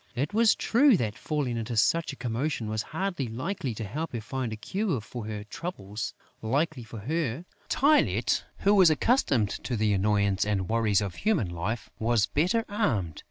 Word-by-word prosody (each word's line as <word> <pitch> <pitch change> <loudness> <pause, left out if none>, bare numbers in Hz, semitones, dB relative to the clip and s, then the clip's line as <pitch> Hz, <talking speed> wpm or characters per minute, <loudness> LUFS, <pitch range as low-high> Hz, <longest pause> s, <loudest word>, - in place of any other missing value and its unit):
It 140 +11 -2
was 225 0 +5
true 255 -1 +4
that 110 -6 -2
falling 140 -6 -2
into 115 0 -3
such 165 +9 +2
a - - -8
commotion 120 0 -2
was 110 0 -1
hardly 160 - -3
likely 130 - -3
to 110 - -5
help 150 +11 -4
her 120 - -2
find 125 +1 -3
a - - -3
cure 185 - -2
for 110 +1 -7
her 105 -1 -5
troubles. 105 - -6 0.3
Luckily 140 +3 0
for 110 -1 -9
her, 155 - -2 0.2
Tylette, 295 +3 +3 0.2
who 200 - +4
was 190 -4 +7
accustomed 145 - +2
to 125 - -2
the 105 -1 +2
annoyances 100 0 +2
and 95 -3 0
worries 110 -3 +2
of 100 -4 -4
human 200 - +1
life, 95 +6 -4
was 115 -1 +2
better 185 - +1
armed. 105 - -1
120 Hz, 175 wpm, -28 LUFS, 105-165 Hz, 0.3 s, was